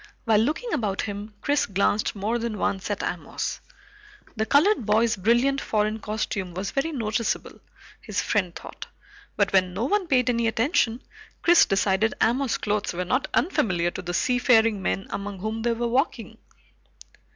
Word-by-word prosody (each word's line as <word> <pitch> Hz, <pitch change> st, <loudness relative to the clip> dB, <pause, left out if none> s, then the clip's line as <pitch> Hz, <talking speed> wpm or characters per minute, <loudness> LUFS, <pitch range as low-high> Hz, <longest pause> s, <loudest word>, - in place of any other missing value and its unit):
While 220 Hz, -3 st, +4 dB
looking 310 Hz, -, -1 dB
about 210 Hz, -9 st, -1 dB
him, 205 Hz, 0 st, -6 dB
Chris 290 Hz, 0 st, +1 dB
glanced 200 Hz, +2 st, 0 dB
more 215 Hz, +4 st, -1 dB
than 230 Hz, -2 st, -3 dB
once 190 Hz, -1 st, -2 dB
at -, -, -2 dB
Amos. -, -, -4 dB, 0.7 s
The 220 Hz, -1 st, -1 dB
colored 305 Hz, -, +4 dB
boy's 220 Hz, +2 st, +2 dB
brilliant 240 Hz, +8 st, +2 dB
foreign 215 Hz, 0 st, 0 dB
costume 205 Hz, -4 st, -3 dB
was 190 Hz, +2 st, -3 dB
very 280 Hz, +4 st, -1 dB
noticeable, 230 Hz, -4 st, -2 dB, 0.4 s
his -, -, -3 dB
friend 185 Hz, -5 st, 0 dB
thought, -, -, -9 dB, 0.5 s
but 200 Hz, -2 st, +1 dB
when 185 Hz, -1 st, +2 dB
no 210 Hz, -, -1 dB
one 395 Hz, +5 st, 0 dB
paid 255 Hz, -4 st, +2 dB
any 235 Hz, -1 st, 0 dB
attention, 230 Hz, 0 st, +1 dB, 0.4 s
Chris 345 Hz, 0 st, +6 dB
decided 195 Hz, +2 st, +1 dB
Amos's 250 Hz, +2 st, +1 dB
clothes 210 Hz, -2 st, -1 dB
were 180 Hz, +1 st, -3 dB
not 255 Hz, +8 st, 0 dB
unfamiliar 180 Hz, -, +1 dB
to -, -, -6 dB
the 175 Hz, 0 st, -4 dB
seafaring 230 Hz, -4 st, +3 dB
men 195 Hz, +1 st, -1 dB
among 200 Hz, 0 st, -5 dB
whom 220 Hz, +4 st, -4 dB
they 235 Hz, +1 st, +1 dB
were 235 Hz, +1 st, -2 dB
walking. 260 Hz, +7 st, -1 dB
220 Hz, 160 wpm, -25 LUFS, 200-250 Hz, 0.7 s, Chris